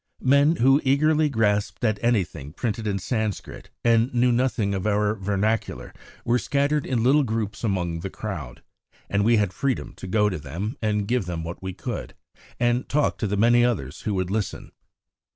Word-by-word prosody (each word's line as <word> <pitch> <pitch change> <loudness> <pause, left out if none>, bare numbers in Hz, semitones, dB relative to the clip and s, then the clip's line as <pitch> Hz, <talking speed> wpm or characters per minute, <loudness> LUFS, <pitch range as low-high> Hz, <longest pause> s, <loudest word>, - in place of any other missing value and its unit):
Men 140 +4 +4
who 135 +1 +4
eagerly 150 +3 +3
grasped 105 -5 0
at 110 -2 0
anything 85 - 0
printed 110 +2 -3
in 100 -1 0
Sanscrit 110 0 -3
and 115 +2 +3
knew 125 +1 +4
nothing 120 -4 +1
of 95 +1 -2
our 105 0 +2
vernacular 105 +2 -2 0.3
were 120 +1 +2
scattered 140 +2 0
in 120 -3 0
little 140 +5 +5
groups 110 -5 -3
among 90 -6 -1
the 95 +3 -5
crowd, 80 - -7 0.5
and 100 0 +2
we 115 +2 +4
had 100 -3 +1
freedom 135 +3 -2
to 95 - -8
go 105 +2 +2
to 90 -5 -2
them 85 - -5
and 105 -2 0
give 120 -5 0
them 85 -2 -3
what 85 +2 -7
we 95 0 -5
could, - - -6 0.4
and 120 +1 +1
talk 150 +1 +1
to 110 - 0
the 100 +1 -1
many 120 +3 +5
others 90 - -1
who 105 - -2
would 95 -1 -1
listen. 105 -2 -3
110 Hz, 180 wpm, -24 LUFS, 95-125 Hz, 0.5 s, little